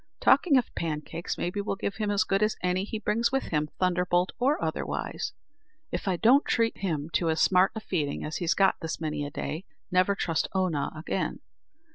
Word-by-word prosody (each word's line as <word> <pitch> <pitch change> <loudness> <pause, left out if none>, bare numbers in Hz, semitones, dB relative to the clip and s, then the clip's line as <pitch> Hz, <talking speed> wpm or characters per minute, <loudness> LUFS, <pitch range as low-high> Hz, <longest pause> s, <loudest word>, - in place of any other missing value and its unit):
Talking 295 -7 +5
of 250 - 0
pancakes, 160 +1 -3
maybe, 180 +4 -2
we'll 200 - -2
give 195 0 -3
him 215 -2 -1
as 205 0 +3
good 195 +1 0
as 215 0 +2
any 180 +1 +1
he 220 - -4
brings 230 +2 +1
with 270 0 +1
him 150 -1 0
thunderbolt 180 0 +1
or 280 +7 +2
otherwise. - - -3 0.6
If - - -3
I 185 - +2
don't 250 - +5
treat 230 -1 +1
him 160 -5 -2
to 170 - +2
as 160 0 +1
smart 185 +1 +4
feeding 150 -9 -2
as 155 - -3
he's 170 -2 +1
got 195 -1 +3
this 160 0 -4
many 155 -2 -2
a 145 - -4
day, 155 +3 -4 0.3
never 185 +2 +3
trust 165 -4 0
Oonagh 165 -6 0
again. 155 - -2
185 Hz, 190 wpm, -28 LUFS, 160-205 Hz, 0.6 s, Talking